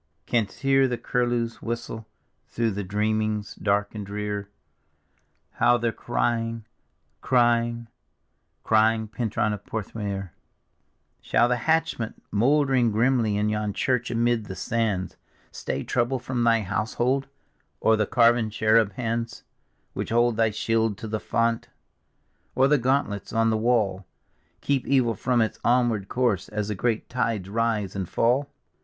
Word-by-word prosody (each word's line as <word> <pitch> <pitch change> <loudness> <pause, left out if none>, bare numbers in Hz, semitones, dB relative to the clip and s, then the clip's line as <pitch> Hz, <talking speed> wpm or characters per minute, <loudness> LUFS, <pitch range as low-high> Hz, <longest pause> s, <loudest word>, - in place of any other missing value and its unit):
Canst 115 -1 -1
hear 135 -1 +4
the 125 -1 -2
curlews' 120 -2 -1
whistle 115 -1 -5 0.4
through 115 -1 -1
thy 100 +1 -3
dreamings 105 +1 -1
dark 105 0 0
and 105 -2 -5
drear, 105 0 -4 1.0
How 120 - +3
they're 115 -1 0
crying, 115 -1 -2 0.6
crying, 120 -1 +2 0.8
crying, 110 0 +3
Pentruan 110 -2 -1
of 105 -1 -7
Porth 110 -1 -5
meor? 100 -4 -4 0.9
Shall 120 - +3
thy 125 0 +1
hatchment, 160 -4 -1
mouldering 130 +1 +3
grimly 115 -1 +2
in 105 +1 +1
yon 105 -1 -1
church 125 +1 0
amid 115 -1 +1
the 95 - -7
sands. 105 -6 -2 0.3
Stay 70 - -4
trouble 125 +2 0
from 125 -1 -2
thy 115 -1 +4
household? 120 +7 -1 0.5
Or 110 - +4
the 105 -2 0
carven 115 -2 +3
cheruh 110 0 +3
hands 115 +1 -3 0.5
Which - - -4
hold 120 0 +2
thy 115 0 +3
shield 110 0 0
to 110 - -7
the 110 0 -2
font? 115 +1 -1 0.9
Or 135 - +4
the 145 0 +3
gauntlets 125 -5 -1
on 115 0 +2
the - - +1
wall 110 -5 +1 0.5
Keep 140 -2 0
evil 130 -4 +3
from 120 +3 +1
its 110 - -4
onward 120 -5 +2
course 120 -8 0
as 105 -1 -3
the - - 0
great 110 +3 -1
tides 115 -6 -1
rise 110 -2 -1
and 95 -3 -3
fall? 130 +5 +1
115 Hz, 140 wpm, -25 LUFS, 105-120 Hz, 1.0 s, hear